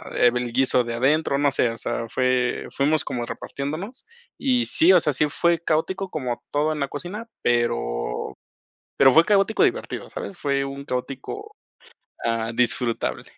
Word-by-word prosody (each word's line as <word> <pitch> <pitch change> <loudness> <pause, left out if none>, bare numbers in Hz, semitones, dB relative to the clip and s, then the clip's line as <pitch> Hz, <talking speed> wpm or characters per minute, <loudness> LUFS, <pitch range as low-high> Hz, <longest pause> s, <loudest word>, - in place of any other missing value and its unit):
eh, 120 - +5
del 120 0 -2
guiso 130 0 +3
de 120 0 -4
adentro, 140 +4 +2
no 145 0 +2
sé, 125 -3 +2
o 115 - -6
sea, 115 +1 -2
fue 130 0 0
fuimos 150 +2 +1
como 120 -1 -3
repartiéndonos, 155 - -6 0.3
y 250 -3 +2
sí, 335 +2 +5
o - - +7
sea, 150 - 0
sí 150 +4 +2
fue 170 +3 +1
caótico 185 +4 -1
como 125 -7 -4
todo 150 +2 +1
en 150 - -5
la 140 - 0
cocina, 185 - -7 0.2
pero - - -1 0.6
pero 135 -1 +6
fue 160 +4 +6
caótico 205 +2 +2
divertido, - - -2
¿sabes?, 195 - -7
fue 140 -1 0
un 140 0 -6
caótico, 135 - -5 0.7
ah, 115 -1 0
disfrutable. 120 0 0
140 Hz, 160 wpm, -23 LUFS, 120-160 Hz, 0.7 s, o